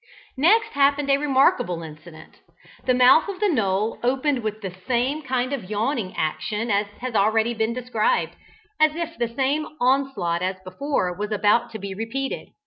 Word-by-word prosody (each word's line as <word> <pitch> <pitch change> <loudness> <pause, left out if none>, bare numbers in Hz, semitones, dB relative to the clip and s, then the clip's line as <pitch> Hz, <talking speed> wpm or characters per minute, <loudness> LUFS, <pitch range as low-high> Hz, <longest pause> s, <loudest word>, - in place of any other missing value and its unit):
Next 415 +10 +4
happened 280 0 +2
a 275 - +5
remarkable 260 - +2
incident. 155 +1 -13 0.5
The 255 - +4
mouth 255 +8 +6
of 390 - -5
the 415 -1 +2
knoll 215 - 0
opened 265 +2 +1
with 215 -1 -4
the 190 -3 -5
same 260 +5 0
kind 255 -1 -1
of 205 -9 -5
yawning 215 -2 -2
action 155 +9 -2
as 200 +1 +1
has 255 -1 -4
been 215 - +4
already 220 +3 +2
described, 230 0 0 0.4
as 310 0 +4
if 335 0 -4
the 235 - +1
same 275 +6 -1
onslaught 245 -10 +1
as 185 +1 -1
before 185 -1 -2
was 210 +3 -4
about 215 +3 +2
to - - -4
be 200 -1 -6
repeated. 225 +7 -4
235 Hz, 165 wpm, -23 LUFS, 205-275 Hz, 0.5 s, mouth